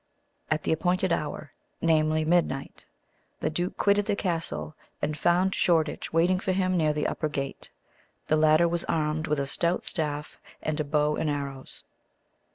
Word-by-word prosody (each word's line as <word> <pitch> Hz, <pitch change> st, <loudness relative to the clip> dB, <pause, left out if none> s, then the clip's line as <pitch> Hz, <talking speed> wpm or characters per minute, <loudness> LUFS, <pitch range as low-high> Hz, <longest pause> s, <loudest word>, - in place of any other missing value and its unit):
At 155 Hz, 0 st, 0 dB
the -, -, 0 dB
appointed 180 Hz, +2 st, +1 dB
hour 150 Hz, -1 st, -3 dB, 0.3 s
namely, 155 Hz, -1 st, +2 dB
midnight 160 Hz, -5 st, 0 dB, 0.5 s
the -, -, -1 dB
duke 175 Hz, +3 st, -2 dB
quitted 205 Hz, 0 st, +3 dB
the 205 Hz, -, +1 dB
castle, 165 Hz, -4 st, -2 dB, 0.2 s
and 155 Hz, -, -1 dB
found 175 Hz, +5 st, +2 dB
Shoreditch 160 Hz, -3 st, +1 dB
waiting 175 Hz, +3 st, +3 dB
for 185 Hz, -, -1 dB
him 185 Hz, -1 st, +1 dB
near 155 Hz, -3 st, +3 dB
the 150 Hz, 0 st, -1 dB
upper 155 Hz, -, -1 dB
gate. 140 Hz, -2 st, -2 dB, 0.6 s
The 155 Hz, -, +2 dB
latter 155 Hz, +2 st, +5 dB
was 170 Hz, 0 st, 0 dB
armed 155 Hz, 0 st, 0 dB
with 150 Hz, -1 st, 0 dB
a 140 Hz, -, 0 dB
stout 170 Hz, +5 st, 0 dB
staff, 150 Hz, -3 st, -3 dB, 0.2 s
and 155 Hz, -1 st, -2 dB
a -, -, +1 dB
bow 150 Hz, 0 st, +1 dB
and 160 Hz, -, 0 dB
arrows. 140 Hz, -2 st, -5 dB
155 Hz, 165 wpm, -27 LUFS, 150-175 Hz, 0.6 s, latter